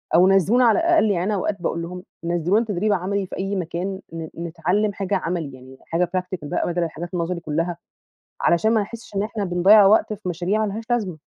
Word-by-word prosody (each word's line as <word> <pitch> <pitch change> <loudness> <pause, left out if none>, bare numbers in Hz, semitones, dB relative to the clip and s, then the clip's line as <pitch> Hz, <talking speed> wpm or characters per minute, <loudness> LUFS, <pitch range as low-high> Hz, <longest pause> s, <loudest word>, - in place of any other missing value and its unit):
أو 180 +2 +6
نزّلونا 195 +6 +4
على 225 -2 +4
الأقل، 330 -10 +3
يعني 175 -3 0
أنا 210 +3 0
أوقات 200 0 -2
باقول 170 -1 -2
لهم 180 +2 -7 0.2
نزّلونا 175 +6 +1
تدريب 205 0 0
عملي 195 +1 -1
في - - -7
أي 195 +1 -2
مكان 185 +2 -3
ن 165 -1 -5
نتعلم 180 +5 -1
حاجة 195 0 -2
عملي 165 -6 -3
يعني، 130 +1 -14
حاجة 170 +1 0
practical 180 -3 -4
بقى - - -1
بدل 175 0 0
الحاجات 170 +1 -5
نظري 170 0 -2
كلها، 165 +2 -2 0.6
علشان 220 +6 +3
ما 220 - +3
نحسش 220 0 -9
إن 195 - +1
إحنا 215 -1 -3
بنضيّع 190 +4 +6
وقت 215 +2 +4
في 185 -3 -5
مشاريع 185 +6 0
ما 200 - -3
لهاش 225 +2 -5
لازمة. 210 -9 -1
185 Hz, 205 wpm, -22 LUFS, 170-205 Hz, 0.6 s, أو